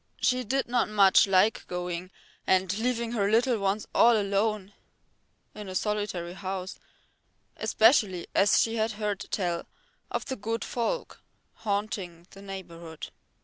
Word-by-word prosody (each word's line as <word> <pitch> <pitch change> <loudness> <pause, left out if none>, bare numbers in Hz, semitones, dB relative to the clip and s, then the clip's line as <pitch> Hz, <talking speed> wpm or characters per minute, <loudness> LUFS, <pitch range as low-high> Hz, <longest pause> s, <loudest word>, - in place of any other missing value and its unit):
She 250 +1 +1
did 265 +4 -1
not 240 -2 +1
much 200 -2 +5
like 195 +3 +2
going 180 0 -4 0.4
and 190 0 +2
leaving 235 -1 -1
her 205 -4 +1
little 235 +1 +2
ones 200 +2 -1
all 230 -2 +5
alone 200 0 -1 0.8
in 210 -2 -8
a 185 - -6
solitary 205 -4 -2
house, 190 -1 -5 0.8
especially 215 -6 +3
as 200 - +4
she 225 0 +1
had 220 +1 0
heard 210 -2 -2
tell 175 -4 -2 0.4
of - - -3
the 265 - -3
good 225 +1 -3
folk 245 - -3 0.3
haunting 200 -5 -3
the 195 - -13
neighbourhood. 170 -5 -8
205 Hz, 135 wpm, -28 LUFS, 185-225 Hz, 0.8 s, much